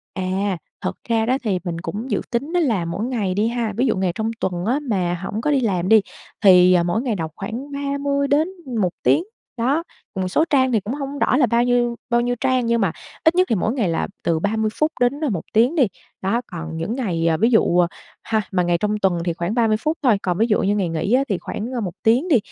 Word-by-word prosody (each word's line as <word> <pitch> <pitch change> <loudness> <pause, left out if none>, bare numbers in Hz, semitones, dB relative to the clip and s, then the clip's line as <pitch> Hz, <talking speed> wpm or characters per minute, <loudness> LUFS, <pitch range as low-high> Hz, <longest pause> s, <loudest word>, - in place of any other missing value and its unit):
À, 190 0 -1 0.2
thật - - -3
ra 225 -1 +2
đó 255 +3 +2
thì 195 -5 0
mình 170 -2 -4
cũng 220 +6 -5
dự 205 - +1
tính 280 +8 -2
đó 355 - +3
là 220 - +1
mỗi 195 +7 -3
ngày 215 -8 -1
đi 210 +3 +1
ha. 235 -3 -2
Ví 255 - +2
dụ 225 - +1
ngày 185 -2 +1
trong 220 0 -1
tuần 180 0 -2
á 255 +6 +1
mà 180 -4 0
hổng 215 +3 -3
có 300 - +1
đi 275 - +3
làm 185 -5 0
đi 220 -2 +7 0.4
thì 180 -1 +7
mỗi 180 +7 0
ngày 240 -5 -1
đọc 160 -3 -4
khoảng 235 +8 -6
30 280 0 -1
đến 295 +4 +2 0.3
1 180 - +2
tiếng. 335 - +4 0.3
Đó, 275 +8 +1 0.3
một 185 -1 -1
số 305 +12 +2
trang 260 -3 +3
thì 220 - +3
cũng 210 +6 -5
hổng 280 0 -5
rõ 255 - +2
là 265 - +5
bao 235 +1 +2
nhiêu 240 -1 +1
bao 240 0 +3
nhiêu 245 0 0
trang 255 -2 +2
nhưng 235 -1 +1
mà 185 -5 +2 0.3
ít 320 +2 +4
nhất 365 0 +3
thì 225 - +2
mỗi 215 +5 0
ngày 225 -9 0
là 165 - -1 0.2
từ 165 -2 +1
30 215 +4 0
phút 305 +1 0
đến 245 +2 +4 0.2
1 170 - -2
tiếng 240 +8 +3
đi. 270 -9 +4 0.3
Đó, 225 +6 0
còn 165 -2 -6
những 175 +9 -3
ngày, 175 -10 -1
à, 160 -1 +2
ví 225 +3 +3
dụ 180 -5 +4 0.4
ha, 220 -1 0
mà 180 -2 +1
ngày 175 0 +2
trong 210 +3 -1
tuần 190 -2 +2
thì 170 - 0
khoảng 170 +4 -3
30 225 -3 +2
phút 310 +6 -1
thôi, 240 -6 +4
còn 180 -1 0
ví 225 +2 +2
dụ 210 - +2
như 200 +2 +1
ngày 190 -4 0
nghỉ 165 +7 -1
á 265 +2 +4
thì 195 - +1
khoảng 225 +7 -5
1 180 -3 -4
tiếng 245 +10 +3
đi. 285 -8 +5
220 Hz, 250 wpm, -21 LUFS, 185-255 Hz, 0.4 s, đi